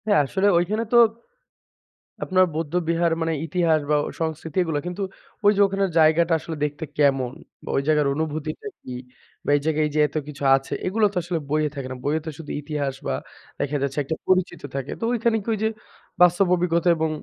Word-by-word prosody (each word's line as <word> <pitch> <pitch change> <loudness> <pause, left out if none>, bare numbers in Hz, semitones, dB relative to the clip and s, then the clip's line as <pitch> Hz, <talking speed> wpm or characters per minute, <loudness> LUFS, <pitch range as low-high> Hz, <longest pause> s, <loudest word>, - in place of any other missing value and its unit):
হ্যা, 205 - +4
আসলে 190 +8 +1
ওইখানে 205 +6 +1
তো - - +7 1.3
আপনার 185 0 +4
বৌদ্ধবিহার 165 +1 0
মানে 165 0 0
ইতিহাস 165 -1 +2
বা - - +5 0.3
সংস্কৃতি 160 0 -3
এগুলো, 160 -4 -1
কিন্তু 180 +3 -5 0.4
ঐযে 205 0 +5
ওখানের 195 0 0
জায়গাটা 160 +2 +4
আসলে 160 +1 -6
দেখতে 145 +1 -5
কেমন 135 -4 +2 0.3
বা - - -9
ওই - - +3
জায়গার 150 -2 +3
অনুভূতিটা 155 - -3
কি? - - -9 0.5
বা - - -2
এই - - -4
জায়গায় 155 -1 +2
এইযে 150 +1 -2
এত 145 - -19
কিছু 145 -1 -8
আছে, 135 0 -3
এগুলো 215 +3 +2
তো - - -4
আসলে 175 0 -2
বইয়ে 155 0 +1
থাকে 135 -2 -5
না। - - -4
বইয়ে 150 +2 +1
তো - - -3
শুধু 160 -3 -8
ইতিহাস 145 -2 -3
বা - - 0 0.5
দেখা 145 +1 -1
যাচ্ছে 140 0 -3
একটা 160 +4 -3
পরিচিত 185 -1 +1
থাকে। 135 0 -3
তো - - -6
ঐখান 235 -1 +1
কি - - -20
ওইযে, 220 +1 0 0.5
বাস্তব 180 +2 +5
অভিজ্ঞতা 175 0 +1
এবং 160 0 0
160 Hz, 185 wpm, -23 LUFS, 150-180 Hz, 1.3 s, তো